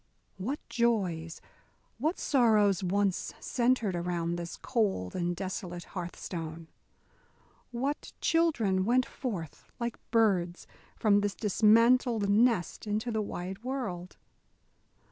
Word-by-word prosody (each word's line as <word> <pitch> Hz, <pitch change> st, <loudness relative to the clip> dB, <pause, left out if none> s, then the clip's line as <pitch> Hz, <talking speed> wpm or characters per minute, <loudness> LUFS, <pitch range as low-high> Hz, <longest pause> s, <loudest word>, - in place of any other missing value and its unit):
What 250 Hz, +11 st, -3 dB
joys, 185 Hz, -9 st, 0 dB, 0.6 s
what 315 Hz, +8 st, 0 dB
sorrows 215 Hz, -8 st, +3 dB
once 195 Hz, +1 st, 0 dB
centred 235 Hz, -6 st, +1 dB
around 170 Hz, -1 st, -1 dB
this 170 Hz, -1 st, -6 dB
cold 205 Hz, -, -1 dB
and 175 Hz, -1 st, -1 dB
desolate 180 Hz, -1 st, -5 dB
hearth 175 Hz, -2 st, -5 dB
stone? 165 Hz, -2 st, -6 dB, 1.0 s
What 265 Hz, +5 st, -3 dB
children 240 Hz, -, +2 dB
went 245 Hz, +4 st, +3 dB
forth 190 Hz, -, -6 dB
like 235 Hz, -1 st, -3 dB
birds 190 Hz, -6 st, +2 dB, 0.3 s
from 205 Hz, -3 st, +4 dB
this 205 Hz, -1 st, -1 dB
dismantled 225 Hz, +1 st, +4 dB
nest 215 Hz, -3 st, +2 dB
into 215 Hz, +3 st, -1 dB
the 220 Hz, -1 st, 0 dB
wide 190 Hz, 0 st, -5 dB
world? 225 Hz, -9 st, -4 dB
205 Hz, 105 wpm, -30 LUFS, 175-235 Hz, 1.0 s, from